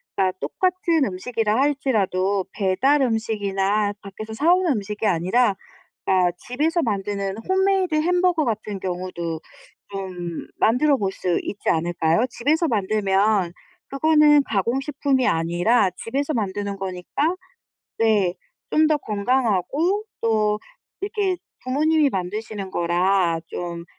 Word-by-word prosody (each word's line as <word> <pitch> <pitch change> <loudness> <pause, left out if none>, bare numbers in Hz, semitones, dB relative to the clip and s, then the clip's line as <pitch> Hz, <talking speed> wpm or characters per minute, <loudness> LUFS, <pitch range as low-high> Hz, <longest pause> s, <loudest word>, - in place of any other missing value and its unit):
그러니까 185 -1 +1
똑같은 355 -5 +1
음식이라 215 +2 -1
할지라도 205 -9 +1
배달 245 +9 +2
음식이나 205 -3 0
밖에서 215 +3 -8
사 315 +10 +4
오는 360 -5 +2
음식이 210 0 -2
아니라 195 +5 +2 0.5
그러니까 180 -2 +3 0.2
집에서 310 +8 +1
만드는 200 -2 -2
홈메이드 380 -3 +2
햄버거 355 +1 +2
같은 215 -3 -3
경우도 175 -3 -4 0.5
좀 180 -4 -5
만들어 270 +5 +3
볼 195 -3 -1
수 180 -2 -1
있지 205 - -3
않을까요? 165 +4 +1
집에서 310 +6 +1
만들면 200 - +1 0.4
그거는 300 0 +5
가공식품이 265 +5 0
아니라 175 +7 +2
집에서 280 +6 -2
만드는 200 -3 -2
거니까 195 - -2 0.6
네 210 -5 +2 0.4
좀 310 0 +4
더 310 -1 +3
건강하고 260 - 0 0.2
또 215 -2 +2 0.4
이렇게 400 -3 0 0.3
부모님이 300 +3 +2
만드시는 195 +1 -4
거라 175 0 +1
좀 170 -1 -5
215 Hz, 290 characters per minute, -23 LUFS, 190-285 Hz, 0.6 s, 그거는